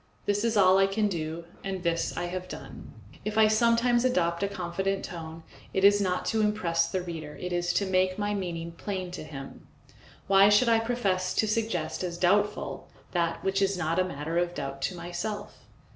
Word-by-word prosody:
This 205 Hz, +1 st, +1 dB
is 230 Hz, -2 st, +1 dB
all 190 Hz, -1 st, +6 dB
I 195 Hz, -, +5 dB
can 210 Hz, +2 st, +1 dB
do, 165 Hz, -3 st, -4 dB, 0.2 s
and 190 Hz, -2 st, -4 dB
this 170 Hz, -1 st, -1 dB
I 175 Hz, -, -1 dB
have 185 Hz, +1 st, -5 dB
done. -, -, -9 dB, 0.3 s
If 215 Hz, 0 st, -3 dB
I 220 Hz, -1 st, +7 dB
sometimes 235 Hz, +2 st, +3 dB
adopt 170 Hz, -9 st, +1 dB
a 200 Hz, -, +2 dB
confident 190 Hz, +1 st, -2 dB
tone, 165 Hz, -2 st, -8 dB, 0.3 s
it 190 Hz, -, +1 dB
is 205 Hz, +1 st, +6 dB
not 180 Hz, -2 st, 0 dB
to 220 Hz, -, +2 dB
impress 170 Hz, -6 st, +1 dB
the 185 Hz, -1 st, -2 dB
reader, 160 Hz, -4 st, -7 dB
it 180 Hz, 0 st, -4 dB
is 175 Hz, 0 st, 0 dB
to 200 Hz, -, +1 dB
make 185 Hz, 0 st, +1 dB
my 205 Hz, 0 st, -1 dB
meaning 170 Hz, -4 st, -4 dB
plain 185 Hz, +1 st, -5 dB
to 180 Hz, -, -6 dB
him. 135 Hz, -3 st, -9 dB, 0.6 s
Why 195 Hz, +1 st, +6 dB
should 210 Hz, +4 st, +5 dB
I 225 Hz, -1 st, +5 dB
profess 200 Hz, -6 st, 0 dB
to 215 Hz, -, +2 dB
suggest 215 Hz, -7 st, -1 dB
as 175 Hz, -1 st, -3 dB
doubtful 205 Hz, +4 st, +1 dB, 0.2 s
that 170 Hz, -2 st, -1 dB
which 195 Hz, 0 st, +1 dB
is 195 Hz, -1 st, +2 dB
not 165 Hz, +1 st, 0 dB
a -, -, +4 dB
matter 165 Hz, -1 st, -2 dB
of 175 Hz, 0 st, -1 dB
doubt 135 Hz, 0 st, -5 dB
to 185 Hz, -, -9 dB
myself? 175 Hz, +5 st, -6 dB
185 Hz, 195 wpm, -28 LUFS, 170-205 Hz, 0.6 s, I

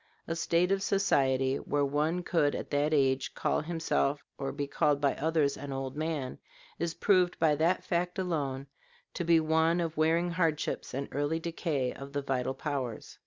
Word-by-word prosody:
A 165 Hz, -, -2 dB
state 170 Hz, +2 st, +1 dB
of 195 Hz, 0 st, +2 dB
society 135 Hz, -10 st, +2 dB
where 145 Hz, 0 st, 0 dB
one 155 Hz, +5 st, 0 dB
could 150 Hz, -5 st, +1 dB
at -, -, -6 dB
that 145 Hz, +1 st, +1 dB
age 135 Hz, -3 st, +1 dB
call -, -, 0 dB
himself 155 Hz, -3 st, 0 dB
or 135 Hz, 0 st, -3 dB
be 145 Hz, -, -3 dB
called 145 Hz, 0 st, +1 dB
by 140 Hz, -2 st, +2 dB
others 155 Hz, -3 st, +1 dB
an 140 Hz, +1 st, -7 dB
old 135 Hz, 0 st, -4 dB
man, 155 Hz, -4 st, -3 dB, 0.4 s
is 170 Hz, -1 st, -2 dB
proved 185 Hz, -3 st, +3 dB
by 160 Hz, -2 st, +3 dB
that 170 Hz, +4 st, +2 dB
fact 175 Hz, +1 st, -1 dB
alone 145 Hz, -8 st, -2 dB, 0.5 s
to 175 Hz, -, -3 dB
be 165 Hz, -1 st, +5 dB
one 160 Hz, +2 st, +2 dB
of 165 Hz, -2 st, -2 dB
wearing 165 Hz, +3 st, +2 dB
hardships 165 Hz, -6 st, -1 dB
and 140 Hz, +1 st, -3 dB
early 145 Hz, +4 st, 0 dB
decay 160 Hz, -6 st, -2 dB
of 140 Hz, 0 st, -10 dB
the 145 Hz, 0 st, -2 dB
vital 135 Hz, -1 st, -1 dB
powers. 135 Hz, -6 st, -4 dB
150 Hz, 175 wpm, -30 LUFS, 140-170 Hz, 0.5 s, be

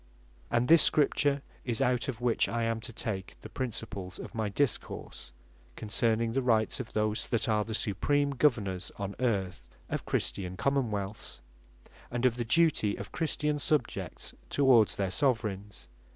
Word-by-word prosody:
And 120 Hz, +1 st, +1 dB
this 165 Hz, +2 st, +8 dB
Scripture 145 Hz, -1 st, +3 dB, 0.2 s
is 120 Hz, -3 st, -3 dB
it, -, -, +3 dB
out 125 Hz, -1 st, +1 dB
of 125 Hz, -3 st, -4 dB
which 120 Hz, -2 st, +2 dB
I 115 Hz, 0 st, -1 dB
am 115 Hz, 0 st, 0 dB
to 120 Hz, +2 st, -6 dB
take 100 Hz, -5 st, -4 dB
the -, -, -9 dB
Principles 105 Hz, -6 st, -5 dB
of -, -, -8 dB
my 110 Hz, -2 st, -1 dB
Discourse, 125 Hz, -, -2 dB, 0.4 s
concerning 115 Hz, +1 st, +1 dB
the 135 Hz, +3 st, 0 dB
Rights 115 Hz, -2 st, +2 dB
of 130 Hz, -, -6 dB
those 110 Hz, +1 st, 0 dB
that 115 Hz, -, 0 dB
are 105 Hz, -1 st, +2 dB
the 110 Hz, 0 st, -4 dB
Supream 140 Hz, +8 st, +1 dB
Govenors 105 Hz, -10 st, +1 dB
on 100 Hz, -1 st, -4 dB
earth, 100 Hz, -8 st, -1 dB, 0.2 s
of -, -, -3 dB
Christian 95 Hz, -1 st, -2 dB
Common 135 Hz, -1 st, +1 dB
wealths; 100 Hz, -9 st, -4 dB, 0.7 s
and 120 Hz, +1 st, -1 dB
of 125 Hz, -1 st, +3 dB
the 120 Hz, -, -1 dB
duty 145 Hz, -6 st, +3 dB
of 100 Hz, -, -8 dB
Christian 150 Hz, -1 st, -1 dB
Subjects 150 Hz, 0 st, -1 dB, 0.2 s
towards 120 Hz, -7 st, +4 dB
their 95 Hz, -2 st, -1 dB
Soveraigns. 105 Hz, -4 st, -1 dB
115 Hz, 160 wpm, -30 LUFS, 105-130 Hz, 0.7 s, this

